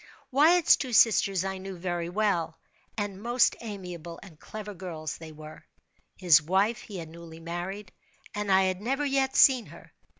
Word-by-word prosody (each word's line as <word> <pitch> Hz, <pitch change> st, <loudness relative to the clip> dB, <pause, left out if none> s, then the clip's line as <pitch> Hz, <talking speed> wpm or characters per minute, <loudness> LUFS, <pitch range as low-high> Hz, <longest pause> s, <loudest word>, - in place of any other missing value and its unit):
Wyatt's 315 Hz, +6 st, +5 dB
two 255 Hz, -3 st, -5 dB
sisters 195 Hz, -5 st, +4 dB
I 190 Hz, 0 st, -4 dB
knew 190 Hz, -1 st, -8 dB
very 175 Hz, -1 st, -3 dB
well, 175 Hz, -5 st, -1 dB, 0.4 s
and 205 Hz, -2 st, -4 dB
most 240 Hz, +2 st, +2 dB
amiable 180 Hz, -6 st, -8 dB
and 170 Hz, -6 st, -15 dB
clever 210 Hz, -1 st, -8 dB
girls 170 Hz, -4 st, -6 dB
they 160 Hz, -1 st, -10 dB
were. 155 Hz, 0 st, -12 dB, 0.5 s
His 170 Hz, -5 st, +5 dB
wife 195 Hz, +7 st, 0 dB
he 205 Hz, -, -9 dB
had 165 Hz, -2 st, -7 dB
newly 165 Hz, 0 st, -12 dB
married, 175 Hz, +4 st, -6 dB, 0.4 s
and 205 Hz, -1 st, -2 dB
I 190 Hz, 0 st, +5 dB
had 185 Hz, 0 st, -1 dB
never 270 Hz, +6 st, -1 dB
yet 270 Hz, -1 st, 0 dB
seen 255 Hz, -4 st, +5 dB
her. -, -, -15 dB
190 Hz, 165 wpm, -27 LUFS, 170-215 Hz, 0.5 s, Wyatt's